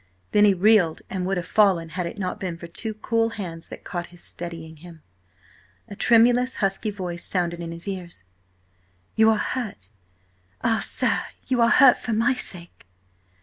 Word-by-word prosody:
Then 210 0 +5
he 205 - +5
reeled 190 -4 +3
and 185 -1 -2
would 195 0 0
have 175 - -3
fallen, 190 -7 +3
had 180 0 -3
it 170 - -8
not 185 -3 -3
been 180 -3 -4
for 170 - -9
two 215 +6 -4
cool 225 +1 0
hands 165 -5 -6
that - - -10
caught 175 -1 -5
his, 175 0 -14
steadying 165 -2 -7
him. 165 0 -14 0.8
A 200 - -9
tremulous, 245 +3 +4
husky 195 +2 -1
voice 180 -4 -5
sounded 175 -2 -2
in 170 -1 -5
his 170 +3 -8
ears: 180 - -6 0.9
"You 220 0 +5
are 220 - +3
hurt! 210 - -4 0.7
Ah, 225 -1 +2
sir, - - +1 0.3
you 255 -2 +1
are 230 - +5
hurt 265 0 +6
for 235 - -3
my 230 +4 +2
sake!" 175 - -7
190 Hz, 175 wpm, -24 LUFS, 170-220 Hz, 0.9 s, hurt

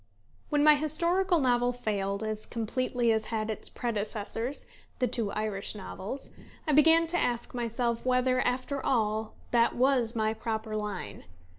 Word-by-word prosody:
When 295 -1 +2
my 305 0 +9
historical 340 +5 +2
novel 245 -2 +2
failed, 200 -4 -2
as 215 0 -3
completely 240 +1 0
as 220 -1 +1
had 220 -1 -2
its 215 - -5
predecessors, 225 +3 -3 0.3
the 250 - +2
two 230 -4 -1
Irish 215 -1 -2
novels, 210 +5 -7 0.4
I - - +3
began 325 +3 +6
to 350 +2 0
ask 240 -1 -1
myself 235 -1 -1
whether, 255 0 +2
after 255 +2 -1
all, 220 -3 0 0.2
that 235 -1 +3
was 250 -2 +2
my 220 -1 +1
proper 220 -1 -4
line. 210 - -5
235 Hz, 145 wpm, -29 LUFS, 215-260 Hz, 0.4 s, my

